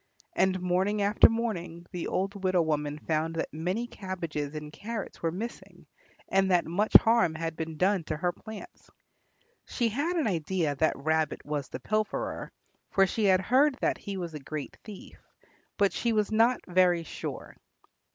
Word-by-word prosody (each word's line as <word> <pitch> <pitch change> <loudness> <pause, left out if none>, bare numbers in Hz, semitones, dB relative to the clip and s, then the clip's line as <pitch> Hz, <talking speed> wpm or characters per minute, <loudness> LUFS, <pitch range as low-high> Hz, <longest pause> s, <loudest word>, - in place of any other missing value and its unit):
And 185 0 +2
morning 190 +3 +1
after 205 +2 +6
morning 180 -7 -3
the 180 -3 -4
old 195 +1 -2
widow 185 -2 +3
woman 150 -2 -1
found 160 +1 -1
that 160 - -3
many 180 +9 -2
cabbages 170 - -5
and 150 0 -7
carrots 220 +2 -6
were 165 - +1
missing 220 +8 -7 0.4
and 195 0 +2
that 180 -2 +3
much 200 +6 -1
harm 225 -8 +7
had 165 0 -3
been 160 -1 -5
done 190 +1 +2
to - - -3
her 175 +2 0
plants. 220 - -11 0.8
She 235 -2 0
had 290 +10 -1
an 325 - +1
idea 170 -4 0
that 155 +3 +1
Rabbit 155 +2 0
was 145 -2 -3
the - - -6
pilferer, 215 +10 -2 0.4
for 195 - +4
she 210 +3 -1
had 190 -1 +5
heard 265 +8 +3
that - - +1
he 200 -2 -5
was 170 -3 -5
a 150 - -5
great 145 +1 -6
thief, 210 -4 -11 0.6
but 200 -2 +3
she 235 -1 0
was 210 -1 +1
not 230 +3 +3
very 180 -2 +3
sure. - - -7
185 Hz, 170 wpm, -29 LUFS, 160-215 Hz, 0.8 s, harm